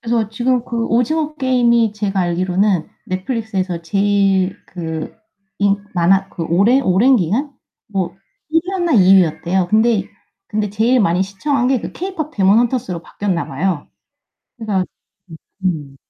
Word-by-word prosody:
그래서 230 -2 0
지금 245 +2 0
그 230 -1 -2
오징어 300 +6 0
게임이 240 -5 +2
제가 200 -2 -2
알기로는 180 0 0 0.2
넷플릭스에서 190 -3 -3
제일 195 +1 +1
그 160 +2 -6 0.4
인 200 0 +3 0.2
많아 190 +3 +3
그 170 - -6
오랜 200 +11 +3
오랜 220 +7 +4
기간? 235 - 0 0.3
뭐 190 -3 -3 0.3
1위였나 345 0 0
2위였대요. 185 -2 +3
근데 220 -2 +2 0.4
근데 210 -1 -1
제일 225 +5 +2
많이 185 -4 +2
시청한 245 +7 -1
게 260 -2 +1
그 - - -7
케이팝 340 -5 -5
데몬 200 +2 +4
헌터스로 235 -8 -1
바뀌었나 185 0 -3
봐요. 160 +2 -2 0.7
그래서 210 -5 -1 0.4
음. 160 - -10 0.3
음. 150 -7 -2
200 Hz, 290 characters per minute, -18 LUFS, 185-240 Hz, 0.7 s, 오랜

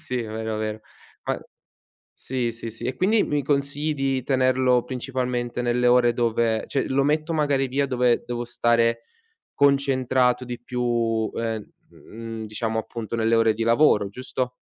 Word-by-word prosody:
Sì, 125 -1 -3
vero, 110 0 -4
vero, 110 0 -3 0.4
ma - - -1 0.8
sì, 125 -3 -3
sì, 115 0 -7
sì 110 - -10
e 130 - -1
quindi 205 - +3
mi 145 -1 -1
consigli 145 +2 0
di 135 -2 -1
tenerlo 130 -1 +2
principalmente 125 -1 -3
nelle 125 0 +1
ore 120 -1 +5
dove 115 -1 +1
cioè, 135 - -1
lo 135 +1 +2
metto 155 +3 0
magari 145 -4 +1
via 140 +2 0
dove 125 -2 +2
devo 120 0 -3
stare 115 -1 +1 0.5
concentrato 130 -3 +2
di 120 -1 -6
più, 120 -3 -1
ehm, 110 -2 -3 0.2
mhmm, 115 0 -8
diciamo, 110 +1 -2
appunto, 115 0 -5
nelle 115 0 +2
ore 115 -1 +4
di 115 - -3
lavoro, 115 -4 +4
giusto? 130 +3 -3
125 Hz, 150 wpm, -24 LUFS, 115-130 Hz, 0.8 s, ore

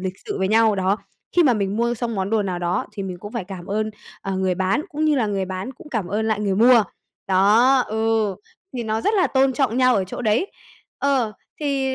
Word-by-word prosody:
lịch 185 0 -3
sự - - -3
với 190 0 0
nhau, 220 -1 +4
đó, 190 +2 +1 0.4
khi 350 - +7
mà 270 - +4
mình 200 -1 -1
mua 235 +1 +1
xong 235 -1 -3
món 190 +1 -2
đồ 220 -2 +2
nào 185 -3 -3
đó 175 +1 -1
thì 200 - -5
mình 185 -2 -5
cũng 205 +3 -9
phải 230 -6 -3
cảm 185 -2 -9
ơn, 215 +2 -1 0.3
ờ, 195 -1 -3
người 190 -1 0
bán, 190 +10 0
cũng 310 -1 -2
như 305 -1 +3
là 230 -5 +1
người 195 -2 -1
bán 185 +7 -5
cũng 350 +1 -14
cảm 215 -7 -2
ơn 215 +3 -1
lại 215 -1 0
người 200 -2 0
mua. 235 0 +6 0.4
Đó, 215 +8 +5
ừ, 220 -2 0 0.4
thì 245 - -2
nó 220 0 -1
rất 420 - +1
là 380 -3 +3
tôn 265 0 +2
trọng 250 -3 0
nhau 255 -1 +4
ở 195 - +1
chỗ 185 - -7
đấy. 225 - +1 0.5
Ờ, 265 -6 +1 0.3
thì, 275 -2 0
220 Hz, 240 wpm, -22 LUFS, 195-255 Hz, 0.5 s, khi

